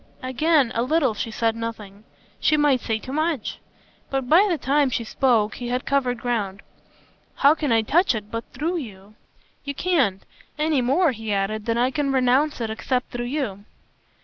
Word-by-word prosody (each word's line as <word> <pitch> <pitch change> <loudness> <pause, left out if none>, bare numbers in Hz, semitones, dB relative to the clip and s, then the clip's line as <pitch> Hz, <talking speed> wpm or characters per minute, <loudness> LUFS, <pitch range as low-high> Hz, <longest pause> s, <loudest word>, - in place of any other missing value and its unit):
Again 265 0 +2
a 230 - 0
little 265 -1 +2
she 220 - -4
said 225 0 0
nothing: 215 -3 -7 0.3
she 305 - +3
might 290 -4 +3
say 225 -2 -1
too 255 +4 -8
much. 310 -5 -1 0.5
But 270 -2 -2
by 355 +9 +6
the 345 - +1
time 280 0 +2
she 245 - -2
spoke 225 -2 +1
he 245 - -5
had 250 +1 -2
covered 260 -3 +1
ground. 215 -5 -3 0.7
"How 280 +2 +5
can 300 -4 -2
I 225 -1 +3
touch 335 - +3
it 210 -1 -6
but 230 0 -3
THROUGH 320 +8 -2
you?" 205 - -9 0.5
"You 280 0 -5
can't. 270 - +1 0.3
Any 305 -3 +1
more," 280 +7 +3
he 220 -3 -5
added, 205 +2 -1
"than 230 0 +1
I 250 +2 +2
can 280 0 -1
renounce 265 +3 +2
it 225 -2 -2
except 250 +3 -2
through 240 0 -4
you." 240 -8 -3
250 Hz, 180 wpm, -23 LUFS, 225-290 Hz, 0.7 s, by